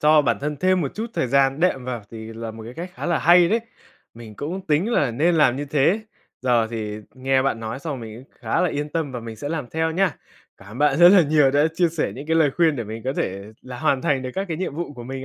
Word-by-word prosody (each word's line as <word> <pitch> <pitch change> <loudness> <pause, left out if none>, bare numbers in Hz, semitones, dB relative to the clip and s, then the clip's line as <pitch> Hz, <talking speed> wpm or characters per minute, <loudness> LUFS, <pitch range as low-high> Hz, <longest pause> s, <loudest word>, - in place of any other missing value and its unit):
cho 150 0 +5
bản - - +1
thân 150 +1 -3
thêm 185 +5 +2
một 140 -5 -3
chút 220 +2 -3
thời - - 0
gian 135 +2 +2
đệm 170 -8 +1
vào 120 -3 -4
thì 110 0 -8
là 115 0 -6
một 110 0 -10
cái 120 +3 -9
cách 175 +2 -6
khá - - -5
là 170 -2 +1
hay 175 +1 +6
đấy, 225 +5 +2 0.5
mình 115 -2 -11
cũng 175 +6 -4
tính 160 +9 +1
là 140 - +2
nên 155 +9 +2
làm 135 -6 +4
như 145 - -3
thế. 150 +8 +2 0.4
Giờ 120 -3 +2
thì 105 -2 -4 0.2
nghe 130 0 +1
bạn 130 -4 -1
nói 110 +2 -5
xong 140 -3 -5
mình 115 +2 -9
cũng - - -33
khá - - 0
là 180 - +2
yên 145 -1 -3
tâm 150 -3 -3
và 125 - -5
mình 115 -1 -8
sẽ 145 - -5
làm 155 -4 -3
theo 160 0 0
nhá. 180 0 0 0.4
Cảm 95 - -16
ơn 120 - -9
bạn 145 -1 +3
rất 175 0 +9
là 190 -1 +7
nhiều 150 -2 +3
đã 145 +2 +3
chia 175 0 +3
sẻ 160 -1 -2
những 140 +3 -8
cái 160 +1 +1
lời 155 -3 +4
khuyên 165 -4 +3
để 120 - -3
mình 110 +2 -7
có 130 - -1
thể 95 -7 -3 0.2
là 125 -1 -8
hoàn 140 -4 +1
thành 135 -2 +1
được 130 - -4
các 195 - -1
cái 165 - -3
nhiệm 180 -4 -3
vụ 170 -2 -4
của 120 - -9
mình 130 +1 -6
140 Hz, 285 wpm, -22 LUFS, 125-160 Hz, 0.5 s, rất